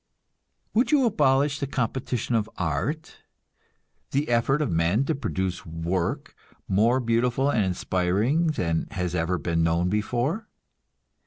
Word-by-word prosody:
Would 235 Hz, +3 st, +2 dB
you 285 Hz, -4 st, +4 dB
abolish 145 Hz, -, +2 dB
the 140 Hz, -, -2 dB
competition 125 Hz, -2 st, -2 dB
of 110 Hz, -1 st, +1 dB
art, 95 Hz, -, -2 dB, 0.9 s
the 140 Hz, +1 st, -1 dB
effort 120 Hz, +4 st, +2 dB
of 150 Hz, -5 st, 0 dB
men 85 Hz, +10 st, +2 dB
to 160 Hz, -, 0 dB
produce 95 Hz, -, -3 dB
work 85 Hz, +2 st, -3 dB, 0.3 s
more 115 Hz, +7 st, +3 dB
beautiful 125 Hz, +3 st, +1 dB
and 110 Hz, -5 st, +2 dB
inspiring 95 Hz, -, +1 dB
than 85 Hz, -, -1 dB
has 90 Hz, -2 st, -3 dB
ever 90 Hz, +1 st, 0 dB
been 85 Hz, +1 st, -1 dB
known 85 Hz, +2 st, +2 dB
before? 120 Hz, -, -1 dB
115 Hz, 130 wpm, -25 LUFS, 90-140 Hz, 0.9 s, you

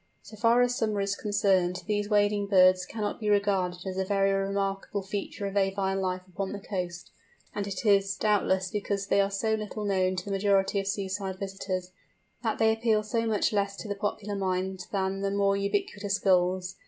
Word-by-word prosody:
So 215 Hz, -, -12 dB
far 230 Hz, +3 st, +4 dB
as 245 Hz, 0 st, +1 dB
summer 215 Hz, -3 st, 0 dB
is 200 Hz, 0 st, 0 dB
concerned, 190 Hz, -4 st, +1 dB
these 205 Hz, -1 st, -1 dB
wading 205 Hz, -1 st, +2 dB
birds 185 Hz, -2 st, +5 dB
cannot 210 Hz, -2 st, -3 dB
be 215 Hz, -2 st, -1 dB
regarded 195 Hz, -3 st, +1 dB
as 190 Hz, 0 st, -3 dB
a -, -, +2 dB
very 195 Hz, 0 st, +2 dB
remarkable 195 Hz, 0 st, -1 dB
feature 200 Hz, +1 st, -4 dB
of 195 Hz, -, -3 dB
avine 195 Hz, -1 st, 0 dB
life 185 Hz, -1 st, -2 dB
upon 190 Hz, +2 st, -4 dB
the 205 Hz, -, -5 dB
coast; 180 Hz, -4 st, -5 dB, 0.4 s
and 205 Hz, -1 st, -3 dB
it 200 Hz, +3 st, -5 dB
is, 195 Hz, -2 st, +3 dB
doubtless, 190 Hz, -3 st, +1 dB
because 200 Hz, -1 st, -2 dB
they 200 Hz, -, +3 dB
are 195 Hz, -, +1 dB
so 220 Hz, +3 st, 0 dB
little 215 Hz, 0 st, -3 dB
known 185 Hz, -2 st, +1 dB
to 180 Hz, -, -4 dB
the 200 Hz, -, -5 dB
majority 195 Hz, 0 st, +2 dB
of 195 Hz, -, -4 dB
seaside 195 Hz, -1 st, -3 dB
visitors, 190 Hz, -2 st, -4 dB, 0.5 s
that 225 Hz, -2 st, -1 dB
they 220 Hz, 0 st, +4 dB
appeal 220 Hz, -1 st, +1 dB
so 230 Hz, +2 st, -1 dB
much 215 Hz, 0 st, +1 dB
less 200 Hz, -1 st, 0 dB
to -, -, -7 dB
the 205 Hz, -, -1 dB
popular 205 Hz, 0 st, -3 dB
mind 190 Hz, -1 st, -2 dB
than 195 Hz, -1 st, -1 dB
the 200 Hz, -, 0 dB
more 200 Hz, 0 st, +2 dB
ubiquitous 200 Hz, -, -1 dB
Gulls. 185 Hz, -1 st, +1 dB
200 Hz, 190 wpm, -28 LUFS, 190-205 Hz, 0.5 s, birds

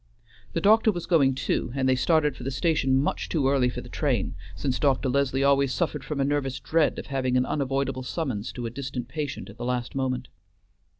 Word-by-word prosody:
The 165 Hz, -, -1 dB
doctor 220 Hz, +3 st, +5 dB
was 175 Hz, -4 st, -5 dB
going 140 Hz, -7 st, +3 dB
too, 130 Hz, -2 st, -1 dB
and 130 Hz, -1 st, +1 dB
they 130 Hz, -, +4 dB
started 150 Hz, +1 st, +2 dB
for -, -, -11 dB
the 130 Hz, -, -3 dB
station 135 Hz, -1 st, +1 dB
much 135 Hz, +2 st, 0 dB
too 145 Hz, -5 st, +1 dB
early 135 Hz, -2 st, +3 dB
for -, -, -5 dB
the -, -, -11 dB
train, -, -, -1 dB, 0.2 s
since 125 Hz, +9 st, -1 dB
Dr. 135 Hz, -2 st, +2 dB
Leslie 135 Hz, 0 st, +1 dB
always 140 Hz, -1 st, +3 dB
suffered 150 Hz, -2 st, -1 dB
from 150 Hz, -1 st, -4 dB
a 135 Hz, -, +2 dB
nervous 140 Hz, -2 st, -1 dB
dread 160 Hz, -1 st, +1 dB
of -, -, -5 dB
having 130 Hz, -2 st, 0 dB
an 125 Hz, -, +2 dB
unavoidable 135 Hz, -2 st, -1 dB
summons 125 Hz, -6 st, -3 dB
to 120 Hz, -, -5 dB
a 115 Hz, -, -3 dB
distant 125 Hz, -1 st, -5 dB
patient 145 Hz, -1 st, -4 dB
at 105 Hz, -, -17 dB
the 120 Hz, -, -6 dB
last 125 Hz, -1 st, -2 dB
moment. 130 Hz, -2 st, -2 dB
135 Hz, 215 wpm, -26 LUFS, 130-145 Hz, 0.2 s, doctor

